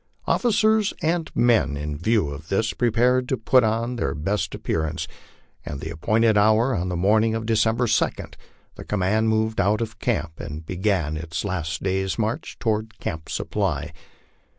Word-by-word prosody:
Officers 220 Hz, -3 st, +2 dB
and 165 Hz, +1 st, 0 dB
men, 115 Hz, -12 st, +3 dB
in 75 Hz, 0 st, -4 dB
view 95 Hz, 0 st, +1 dB
of 75 Hz, +3 st, -9 dB
this, 110 Hz, +3 st, +1 dB
prepared 125 Hz, +2 st, +2 dB
to 130 Hz, -, +1 dB
put 125 Hz, +3 st, +4 dB
on 115 Hz, +3 st, 0 dB
their 105 Hz, -, -1 dB
best 95 Hz, +8 st, -2 dB
ap -, -, -10 dB
pearance. 80 Hz, -1 st, -2 dB, 0.6 s
At 70 Hz, -, -6 dB
the 80 Hz, -, -5 dB
appointed 110 Hz, +6 st, +2 dB
hour 110 Hz, +4 st, +3 dB
on 90 Hz, 0 st, -2 dB
the 90 Hz, -, -2 dB
morning 110 Hz, +5 st, +3 dB
of 115 Hz, 0 st, -3 dB
December 115 Hz, +1 st, +2 dB
2, 115 Hz, -, +3 dB, 0.7 s
the -, -, -10 dB
com 105 Hz, -2 st, -2 dB
mand 110 Hz, +4 st, +2 dB
moved 110 Hz, -1 st, +1 dB
out 100 Hz, +2 st, +2 dB
of 110 Hz, -1 st, -5 dB
camp 80 Hz, 0 st, -2 dB
and 75 Hz, +2 st, -7 dB
began 90 Hz, -4 st, -1 dB
its 80 Hz, +3 st, -4 dB
last 80 Hz, -4 st, -3 dB
day's 95 Hz, 0 st, -1 dB
march 115 Hz, +7 st, -2 dB
toward 110 Hz, -2 st, -2 dB
Camp 80 Hz, -4 st, -5 dB
Sup -, -, -4 dB
ply. -, -, -1 dB
110 Hz, 175 wpm, -24 LUFS, 85-115 Hz, 0.7 s, put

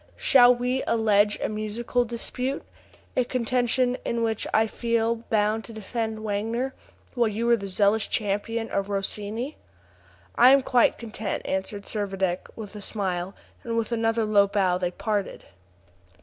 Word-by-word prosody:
Shall 250 Hz, -2 st, +6 dB
we 250 Hz, +2 st, -1 dB
allege 210 Hz, -2 st, +3 dB
a -, -, +1 dB
musical 215 Hz, +3 st, -1 dB
dispute? 250 Hz, +3 st, -3 dB, 0.5 s
a 255 Hz, -, +3 dB
contention 250 Hz, +1 st, 0 dB
in 235 Hz, 0 st, -1 dB
which 225 Hz, -1 st, -1 dB
I 220 Hz, -, +4 dB
feel 230 Hz, 0 st, 0 dB
bound 215 Hz, +1 st, +1 dB
to 230 Hz, -, -10 dB
defend 220 Hz, 0 st, -4 dB
Wagner, 225 Hz, +5 st, -2 dB, 0.4 s
while 240 Hz, -3 st, +2 dB
you 220 Hz, +2 st, -2 dB
are -, -, +7 dB
the 200 Hz, -3 st, -6 dB
zealous 205 Hz, +3 st, +2 dB
champion 225 Hz, +2 st, -2 dB
of 195 Hz, 0 st, -1 dB
Rossini?" 210 Hz, +7 st, -3 dB, 0.8 s
"I 250 Hz, +2 st, +7 dB
am 275 Hz, -1 st, +4 dB
quite 250 Hz, -2 st, +3 dB
content," 220 Hz, -3 st, -4 dB
answered 190 Hz, +2 st, -3 dB
Servadac, 195 Hz, -4 st, -2 dB
with 215 Hz, -2 st, -8 dB
a 210 Hz, -, -7 dB
smile; 190 Hz, -3 st, -3 dB, 0.3 s
and 230 Hz, -1 st, -2 dB
with 230 Hz, 0 st, -1 dB
another 225 Hz, -1 st, +1 dB
low 205 Hz, -2 st, +4 dB
bow 190 Hz, -3 st, +1 dB
they 180 Hz, -1 st, 0 dB
parted. 205 Hz, +2 st, -3 dB
220 Hz, 150 wpm, -25 LUFS, 205-235 Hz, 0.8 s, are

